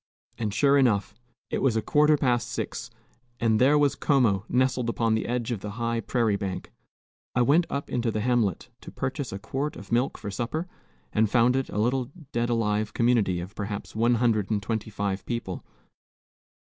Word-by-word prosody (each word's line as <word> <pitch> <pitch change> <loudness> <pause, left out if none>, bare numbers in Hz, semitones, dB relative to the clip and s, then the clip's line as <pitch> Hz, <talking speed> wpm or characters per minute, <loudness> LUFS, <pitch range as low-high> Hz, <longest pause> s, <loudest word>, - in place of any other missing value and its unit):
And 110 -3 -1
sure 140 +6 +4
enough, 105 -6 +2 0.4
it - - -1
was 130 -5 +2
a 110 - +2
quarter 150 +4 +4
past 120 -4 +1
six, 115 - -4 0.5
and 110 -1 +2
there 140 +4 +5
was 145 -2 +3
Como 115 -9 +2
nestled 130 -1 +1
upon 115 -1 +1
the 110 - 0
edge 120 0 -2
of 115 - -2
the 105 +1 -6
high 115 -1 -1
prairie 115 -4 +1
bank. 95 -2 -5 0.6
I 125 - +4
went 160 +7 +4
up 140 - -3
into 120 -1 -1
the 110 -1 -1
hamlet 115 -6 0
to - - -10
purchase 135 0 -3
a 95 - -4
quart 135 +8 -3
of 100 - -11
milk 120 +3 +1
for 105 -2 -6
supper, 130 - -3 0.5
and 110 -1 +3
found 120 +2 +4
it 135 0 -1
a - - -5
little 125 +3 +1 0.2
dead 120 0 0
alive 110 -2 0
community 115 -7 +2
of 90 +4 -7
perhaps 100 0 -5
one 120 +2 +3
hundred 110 -4 +1
and 105 -2 0
twenty 110 0 -2
five 100 -2 -2
people. 115 -6 -4
115 Hz, 190 wpm, -26 LUFS, 105-125 Hz, 0.6 s, there